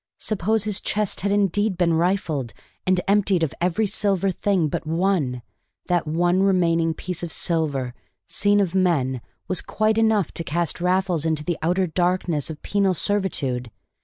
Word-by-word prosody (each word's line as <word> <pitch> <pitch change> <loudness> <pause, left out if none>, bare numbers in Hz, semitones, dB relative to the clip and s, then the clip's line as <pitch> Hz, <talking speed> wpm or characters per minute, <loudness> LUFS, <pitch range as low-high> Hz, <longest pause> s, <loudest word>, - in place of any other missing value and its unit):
Suppose 215 +1 0
his 210 -2 -2
chest 210 -2 -1
had 200 +2 0
indeed 205 0 +1
been 170 -2 +2
rifled, 165 - 0 0.3
and 185 -1 +3
emptied 195 -3 +3
of 155 - -1
every 180 +5 +1
silver 195 -2 0
thing 185 -3 +1
but 150 - -4
one; 165 -8 0 0.4
that 175 -3 0
one 175 +4 +2
remaining 170 -4 +2
piece 180 0 -5
of 170 -2 -5
silver, 145 -9 -1 0.3
seen 205 +1 +2
of 190 -4 0
men, 145 -10 +1 0.3
was 185 - -1
quite 215 +1 +1
enough 220 -6 +2
to 165 - -3
cast 170 +2 -2
Raffles 180 -2 +1
into 160 -2 0
the 175 0 -2
outer 180 +4 +1
darkness 175 -3 0
of 155 -2 -8
penal 195 -2 +1
servitude! 145 - -1
180 Hz, 160 wpm, -23 LUFS, 160-195 Hz, 0.4 s, and